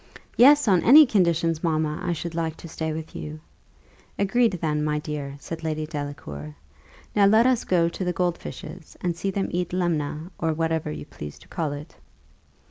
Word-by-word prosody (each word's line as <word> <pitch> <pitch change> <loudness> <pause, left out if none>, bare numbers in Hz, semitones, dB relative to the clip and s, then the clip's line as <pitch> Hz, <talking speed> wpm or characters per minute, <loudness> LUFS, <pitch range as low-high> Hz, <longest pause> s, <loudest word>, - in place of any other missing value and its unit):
"Yes. 285 +2 +7
On 185 -4 +4
any 300 +5 +9
conditions, 170 - +1
mamma, 155 -2 0
I 175 - -1
should 170 0 -4
like 165 -1 -2
to - - -10
stay 160 0 -3
with 160 0 -6
you." 155 +1 -6 0.8
"Agreed, 220 +2 +2
then, 155 -4 -1
my 150 0 0
dear!" 150 -2 -5
said 165 +3 -7
Lady 155 -1 -2
Delacour. 145 - -6 0.6
"Now 200 -1 +6
let 220 +3 +5
us 255 -2 +3
go 170 -2 +3
to 170 +3 -4
the 180 - 0
gold 175 -1 -1
fishes, 175 -4 -9
and 175 -2 -1
see 195 +3 -2
them 195 0 -1
eat 175 0 -2
lemna, 165 -2 -1
or 160 -1 0
whatever 160 0 -1
you 75 -1 -6
please 75 -1 -9
to - - -18
call 160 -5 -2
it." 145 +3 -8
165 Hz, 185 wpm, -25 LUFS, 150-180 Hz, 0.8 s, any